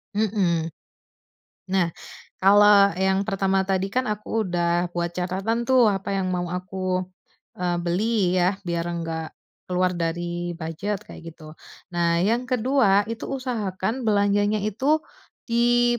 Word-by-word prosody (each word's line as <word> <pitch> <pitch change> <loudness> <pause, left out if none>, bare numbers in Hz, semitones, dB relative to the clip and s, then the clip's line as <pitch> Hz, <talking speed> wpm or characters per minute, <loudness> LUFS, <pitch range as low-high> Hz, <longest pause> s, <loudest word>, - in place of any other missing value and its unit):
Mhm. 185 -6 +1 1.0
Nah, 180 -3 +2 0.5
kalau 200 -1 +6
yang 190 +2 +1
pertama 195 -1 +1
tadi 195 0 0
kan 255 +3 0
aku 210 0 -2
udah 175 0 +1
buat 170 0 -1
catatan 190 +7 -2
tuh, 250 -5 +5
apa 195 0 -2
yang 185 -1 -1
mau 180 -1 -1
aku, 185 +1 -2 0.6
eee, 175 -1 0
beli, 185 +1 +1
ya, 180 +2 +2
biar 170 -1 -2
enggak 165 -2 -4 0.3
keluar 180 0 +1
dari 175 +1 -3
bujet, 170 +5 -4
kayak 165 0 -10
gitu. 155 -1 -12 0.4
Nah, 170 -1 +2
yang 235 +6 +1
ke-2, 250 -5 +3
itu 230 - -5
usahakan 235 -3 -3
belanjanya 205 0 +2
itu 270 +9 +1 0.4
di 240 0 +3
190 Hz, 130 wpm, -24 LUFS, 175-215 Hz, 1.0 s, kalau